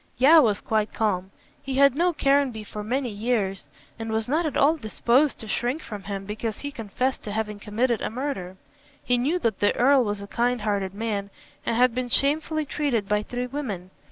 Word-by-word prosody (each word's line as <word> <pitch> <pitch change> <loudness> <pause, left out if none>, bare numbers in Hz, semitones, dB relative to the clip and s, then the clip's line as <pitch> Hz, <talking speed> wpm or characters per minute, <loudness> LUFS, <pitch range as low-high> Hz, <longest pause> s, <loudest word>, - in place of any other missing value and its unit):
Yeo 305 +6 +7
was 215 -6 +1
quite 215 -1 0
calm. 190 -4 -1 0.3
He 270 -1 -4
had 275 -1 +5
known 345 +2 +2
Caranby 275 -6 +2
for 210 0 -7
many 250 +2 -1
years, 205 -3 -1 0.3
and 225 0 -4
was 220 0 -1
not 315 +5 +1
at 295 - -3
all 295 +4 +4
disposed 260 +2 +1
to 220 - -8
shrink 245 +8 -1
from 205 -3 -8
him 195 -1 -4
because 215 +1 -4
he 285 - -4
confessed 250 +2 -2
to 210 - -5
having 210 -1 -3
committed 225 +3 0
a - - -1
murder. 220 -8 -4 0.5
He 245 0 +2
knew 295 +9 +1
that 230 - -1
the 205 - +2
Earl 265 +1 +5
was 205 -2 -2
a 200 - -7
kind 240 +3 0
hearted 200 -2 -1
man 205 -2 -2 0.4
and - - +1
had 250 0 +4
been 250 0 -2
shamefully 305 +4 +2
treated 270 -8 -1
by 210 0 +1
three 245 +3 -4
women. 230 -9 -5
235 Hz, 200 wpm, -25 LUFS, 210-275 Hz, 0.5 s, Yeo